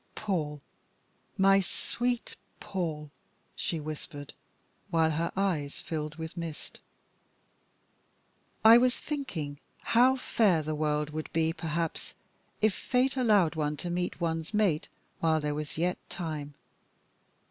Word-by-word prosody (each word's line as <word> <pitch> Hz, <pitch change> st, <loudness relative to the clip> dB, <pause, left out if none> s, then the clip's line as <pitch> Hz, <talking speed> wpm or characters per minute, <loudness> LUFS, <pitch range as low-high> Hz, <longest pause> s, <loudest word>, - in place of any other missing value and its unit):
"Paul, 155 Hz, -8 st, -2 dB, 0.7 s
my 195 Hz, 0 st, +6 dB
sweet 240 Hz, +5 st, -2 dB, 0.2 s
Paul," 155 Hz, -6 st, -3 dB, 0.4 s
she 165 Hz, -, -2 dB
whispered, 150 Hz, -1 st, -7 dB, 0.6 s
while 160 Hz, -1 st, +3 dB
her 165 Hz, +2 st, -1 dB
eyes 165 Hz, -8 st, 0 dB
filled 155 Hz, -1 st, -4 dB
with 160 Hz, 0 st, -6 dB
mist, 165 Hz, -3 st, -7 dB, 1.9 s
"I 230 Hz, +2 st, +10 dB
was 250 Hz, 0 st, +3 dB
thinking 165 Hz, -, -4 dB, 0.3 s
how 250 Hz, +3 st, +6 dB
fair 205 Hz, -10 st, +2 dB
the 155 Hz, +1 st, -2 dB
world 150 Hz, 0 st, 0 dB
could 155 Hz, 0 st, -5 dB
be, 160 Hz, 0 st, +2 dB
perhaps, 165 Hz, -1 st, -3 dB, 0.5 s
if 215 Hz, -2 st, +5 dB
fate 260 Hz, +5 st, +1 dB
allowed 210 Hz, -10 st, +4 dB
one 150 Hz, -2 st, -1 dB
to 175 Hz, -, -4 dB
meet 180 Hz, 0 st, -2 dB
one's 165 Hz, +3 st, -2 dB
mate 195 Hz, -8 st, +2 dB, 0.3 s
while 160 Hz, -1 st, +3 dB
there 150 Hz, -1 st, -1 dB
was 150 Hz, 0 st, -5 dB
yet 180 Hz, +2 st, 0 dB
time. 155 Hz, -4 st, -4 dB
165 Hz, 120 wpm, -30 LUFS, 150-195 Hz, 1.9 s, I